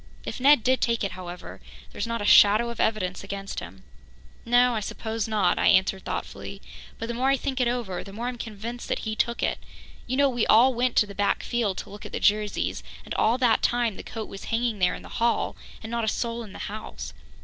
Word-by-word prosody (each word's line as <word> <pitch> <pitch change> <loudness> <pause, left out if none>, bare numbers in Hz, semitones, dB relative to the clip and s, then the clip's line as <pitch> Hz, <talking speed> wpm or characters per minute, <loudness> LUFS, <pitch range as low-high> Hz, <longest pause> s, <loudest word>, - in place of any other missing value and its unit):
If - - -5
Ned 275 -2 +6
did 260 0 +2
take 230 -2 +1
it, 200 - -1
however, 180 -1 -8 0.3
there's - - -4
not 230 -2 -2
a - - -2
shadow 215 +4 +6
of 235 - -9
evidence 195 -5 0
against 195 0 -5
him." 95 +3 -11 0.6
"No, 245 +1 +4
I 220 - 0
suppose 220 +1 -3
not," 215 -3 +2
I - - +3
answered 190 0 +3
thoughtfully, 200 - -5 0.4
"but 230 - -4
the 235 - -3
more 255 +3 +1
I 275 - +3
think 265 -1 -2
it 245 - +3
over, 235 -7 -2
the 195 - -10
more 225 +4 -5
I'm 245 -1 -4
convinced 230 +2 -6
that - - -2
he 215 0 -2
took 235 +2 0
it. - - 0 0.5
You 255 +2 -1
know, 280 0 +5
we 240 -4 0
all 250 +4 +6
went 245 +1 0
to - - +5
the 200 - -10
back 200 0 0
field 230 -6 -1
to - - -8
look 205 - -10
at - - -9
the - - -2
Jerseys, 210 0 +1 0.2
and - - -5
all 230 +3 +2
that 245 -3 +3
time 240 -3 +1
the - - -7
coat 220 -2 -6
was 195 - -9
hanging 230 -2 -1
there 180 -1 +2
in - - -10
the - - -10
hall, 235 0 +1 0.3
and 220 - -7
not 235 -1 -1
a - - -1
soul 235 +1 -1
in 215 -4 -9
the - - -9
house. 215 +2 -7
225 Hz, 235 wpm, -26 LUFS, 200-240 Hz, 0.6 s, Ned